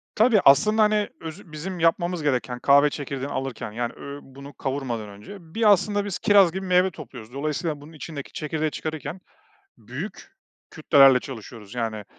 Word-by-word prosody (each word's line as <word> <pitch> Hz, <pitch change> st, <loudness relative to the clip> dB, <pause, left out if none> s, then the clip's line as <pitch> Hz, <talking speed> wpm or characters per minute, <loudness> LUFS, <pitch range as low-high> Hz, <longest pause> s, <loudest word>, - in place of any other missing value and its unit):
Tabii, 220 Hz, -1 st, +5 dB
aslında, 215 Hz, +11 st, +6 dB
hani, 210 Hz, -1 st, +2 dB
özü 165 Hz, +2 st, -9 dB
bizim 175 Hz, +4 st, -6 dB
yapmamız 170 Hz, 0 st, +1 dB
gereken 125 Hz, -3 st, -1 dB
kahve 140 Hz, +2 st, +5 dB
çekirdeğini 140 Hz, -1 st, -5 dB
alırken, 130 Hz, -5 st, -4 dB
yani 120 Hz, +2 st, -3 dB
ö 140 Hz, 0 st, -8 dB
bunu 140 Hz, +2 st, -12 dB
kavurmadan 130 Hz, -6 st, -4 dB
önce, 105 Hz, -, -11 dB, 0.2 s
bir, 220 Hz, -2 st, +5 dB
aslında, 205 Hz, +1 st, +2 dB
biz 200 Hz, -3 st, -4 dB
kiraz 200 Hz, -4 st, +5 dB
gibi 190 Hz, +2 st, -5 dB
meyve 185 Hz, +1 st, +3 dB
topluyoruz. 125 Hz, -7 st, -11 dB
Dolayısıyla 150 Hz, +2 st, -3 dB
bunun 155 Hz, +3 st, -13 dB
içindeki 150 Hz, -2 st, -8 dB
çekirdeği 155 Hz, 0 st, -2 dB
çıkarırken 160 Hz, +4 st, -5 dB, 0.6 s
büyük -, -, -8 dB, 0.4 s
kütlelerle 135 Hz, -4 st, +6 dB
çalışıyoruz 115 Hz, -4 st, -10 dB
yani 110 Hz, -3 st, -3 dB
150 Hz, 155 wpm, -24 LUFS, 130-180 Hz, 0.6 s, aslında